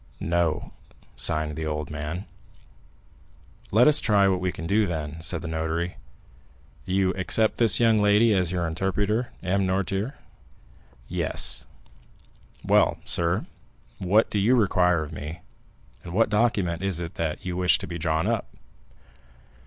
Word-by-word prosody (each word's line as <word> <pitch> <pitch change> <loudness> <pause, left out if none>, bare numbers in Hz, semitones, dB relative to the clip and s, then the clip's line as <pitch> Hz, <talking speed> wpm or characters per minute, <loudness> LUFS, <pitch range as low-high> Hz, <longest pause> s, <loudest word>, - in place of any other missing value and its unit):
"No," 85 -1 -1 0.4
signed 75 -1 0
the 80 0 -4
old 75 -1 -4
man. 75 +5 -5 1.4
"Let 115 +6 +5
us 150 0 +4
try 100 -3 +3
what 95 -1 +1
we 90 0 -1
can 80 - -8
do, 105 +4 +2
then," 80 -1 -5
said 85 +1 -2
the - - -5
notary. 80 +2 -3 0.9
"You 95 0 +1
accept 110 +4 +1
this 115 -5 +5
young 115 -2 +4
lady 105 +2 +4
as 90 -3 +1
your 90 -2 -1
interpreter, 100 +7 -1
M. 95 +1 0
Noirtier?" 95 +7 -1 0.9
"Yes." - - 0 1.0
"Well, - - +3
sir, 85 0 +1 0.5
what 100 +4 +2
do 105 - 0
you 115 +6 +3
require 90 -7 +2
of 75 - -9
me, 80 +3 -7 0.6
and 85 - -8
what 110 +2 +2
document 100 -6 +1
is 95 -3 -1
it 85 0 -5
that 80 +1 -4
you 90 -1 -3
wish 90 0 +3
to - - -7
be 85 -1 -6
drawn 80 +1 0
up?" 115 0 -1
90 Hz, 145 wpm, -25 LUFS, 80-105 Hz, 1.4 s, Let